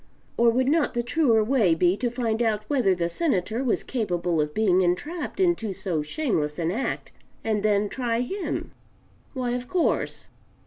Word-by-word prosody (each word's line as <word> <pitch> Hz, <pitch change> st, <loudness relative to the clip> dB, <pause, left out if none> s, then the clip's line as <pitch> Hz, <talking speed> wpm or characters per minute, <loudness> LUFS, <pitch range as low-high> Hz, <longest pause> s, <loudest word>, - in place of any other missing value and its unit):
Or 235 Hz, 0 st, +4 dB
would 255 Hz, +3 st, +1 dB
not 305 Hz, -1 st, +2 dB
the 240 Hz, -, 0 dB
truer 240 Hz, -4 st, +3 dB
way 215 Hz, -8 st, +3 dB
be 175 Hz, +2 st, +3 dB
to 240 Hz, +3 st, -1 dB
find 230 Hz, -2 st, -1 dB
out 215 Hz, -2 st, +1 dB
whether 245 Hz, -10 st, +2 dB
the 170 Hz, -1 st, -1 dB
Senator 220 Hz, -, -1 dB
was 245 Hz, -, 0 dB
capable 175 Hz, -9 st, -1 dB
of 150 Hz, 0 st, -2 dB
being 190 Hz, -4 st, +3 dB
entrapped 295 Hz, -, -2 dB
into 345 Hz, -, +1 dB
so 185 Hz, -4 st, -2 dB
shameless 150 Hz, -, -1 dB
an 170 Hz, 0 st, 0 dB
act, 235 Hz, +8 st, -3 dB, 0.3 s
and 215 Hz, -2 st, 0 dB
then 205 Hz, 0 st, +2 dB
try 235 Hz, +1 st, -1 dB
him? 385 Hz, +10 st, -3 dB, 0.6 s
Why, 250 Hz, -2 st, -1 dB
of 245 Hz, 0 st, -3 dB
course. 360 Hz, -3 st, -1 dB
225 Hz, 170 wpm, -25 LUFS, 185-255 Hz, 0.6 s, Or